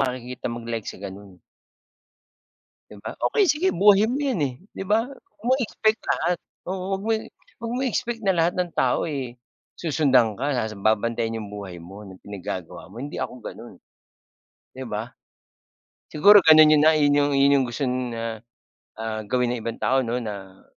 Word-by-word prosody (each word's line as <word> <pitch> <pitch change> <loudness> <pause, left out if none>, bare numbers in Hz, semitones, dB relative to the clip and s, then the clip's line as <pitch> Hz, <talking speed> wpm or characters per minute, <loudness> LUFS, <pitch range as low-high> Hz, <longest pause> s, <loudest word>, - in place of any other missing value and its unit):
makikita 125 -1 -3
mag-like 115 -2 -5
sa - - -6
ganun. 100 -1 -10 1.5
'Di 105 - -12
ba? - - -4 0.2
Okey 415 -3 +3
sige 315 +6 0
buhay 205 +1 +5
mo 260 - -1
'yan, 265 -9 0
eh, 135 -3 0 0.2
'di - - -5
ba? 220 +3 +2
'Wag 275 - -18
mo 255 - +4
expect 220 -1 +1
lahat. 175 +1 +1 0.3
Oo, 190 +1 -2
'wag - - -9
mo 225 - +1 0.5
'wag 230 0 -4
mong 265 - -1
expect 235 -1 -2
na 190 - +4
lahat 170 +1 +2
ng 180 -2 -1
tao, 130 +4 +1
eh, 130 -6 -5 0.4
susundan 135 -9 +2
ka 140 +4 -1
ta's 110 -4 -2
babantayan 115 +2 0
yung 105 - -8
buhay 100 -4 -7
mo, 95 +4 -11
ng 95 -1 -12
pinaggagawa 95 -4 -7
mo, 105 - -13
hindi 145 +2 -6
ako 125 - -4
gano'n, - - -9 1.0
'di 130 0 -7
ba? 110 +3 -5 1.0
Siguro 205 +7 +7
ganun 155 -1 +8
yun 150 - +4
na 160 +1 +6
yun 145 -1 +3 0.4
yung 135 -2 +3
gusto 135 +3 -2
na 115 -3 -3 0.6
ah, 110 -1 -4
gawin 125 +2 0
ng 120 - -4
ibang 115 -1 -5
tao 135 0 +2
'no 120 0 -2
na 95 -3 -8
130 Hz, 170 wpm, -24 LUFS, 110-180 Hz, 1.5 s, ganun